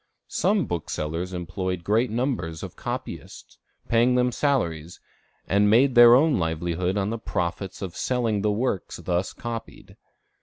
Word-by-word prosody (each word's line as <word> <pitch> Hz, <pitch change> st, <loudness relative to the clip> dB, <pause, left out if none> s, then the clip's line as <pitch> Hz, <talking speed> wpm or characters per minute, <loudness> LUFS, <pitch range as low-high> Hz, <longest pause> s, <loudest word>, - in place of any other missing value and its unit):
Some 205 Hz, -4 st, +2 dB
booksellers 85 Hz, +1 st, -3 dB
employed 90 Hz, 0 st, -4 dB
great 110 Hz, +6 st, +2 dB
numbers 110 Hz, -, -2 dB
of -, -, -8 dB
copyists, -, -, -7 dB, 0.3 s
paying 120 Hz, +2 st, +3 dB
them 125 Hz, 0 st, +2 dB
salaries, 85 Hz, -, -1 dB, 0.5 s
and 100 Hz, +1 st, +3 dB
made 125 Hz, +5 st, +5 dB
their 120 Hz, 0 st, +9 dB
own 150 Hz, -2 st, +3 dB
livelihood 85 Hz, +3 st, -1 dB
on 100 Hz, +1 st, 0 dB
the 115 Hz, -, -3 dB
profits 95 Hz, 0 st, -3 dB
of 90 Hz, -2 st, -6 dB
selling 115 Hz, -5 st, 0 dB
the 105 Hz, +1 st, +1 dB
works 105 Hz, -3 st, -2 dB
thus 90 Hz, +1 st, -2 dB
copied. 115 Hz, -1 st, -8 dB
105 Hz, 140 wpm, -25 LUFS, 85-120 Hz, 0.5 s, their